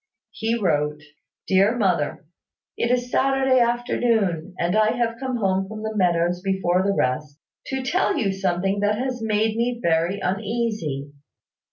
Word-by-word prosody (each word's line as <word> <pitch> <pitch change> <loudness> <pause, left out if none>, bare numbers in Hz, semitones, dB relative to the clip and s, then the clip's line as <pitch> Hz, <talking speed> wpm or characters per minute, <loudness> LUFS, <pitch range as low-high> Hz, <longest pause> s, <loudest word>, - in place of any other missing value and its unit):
He 225 +1 -1
wrote, 150 -6 0 0.4
"Dear 195 +5 +3
Mother, 180 -9 0 0.5
"It 235 - -1
is 245 0 0
Saturday 265 -1 +3
afternoon, 230 -7 0
and 175 +3 0
I 215 0 +3
have 235 -1 -1
come 260 -2 -2
home 195 -3 0
from 215 +1 -7
the 220 0 -4
meadows 175 -2 +1
before 190 -2 +1
the 200 +1 +1
rest, 140 +3 -1 0.3
to 265 -1 -3
tell 345 +5 +1
you 210 -9 +1
something 195 +1 -1
that 205 +1 +1
has 255 -1 -3
made 220 0 +1
me 240 +1 -1
very 170 +1 +1
uneasy. 195 - -2
205 Hz, 150 wpm, -23 LUFS, 180-235 Hz, 0.5 s, Dear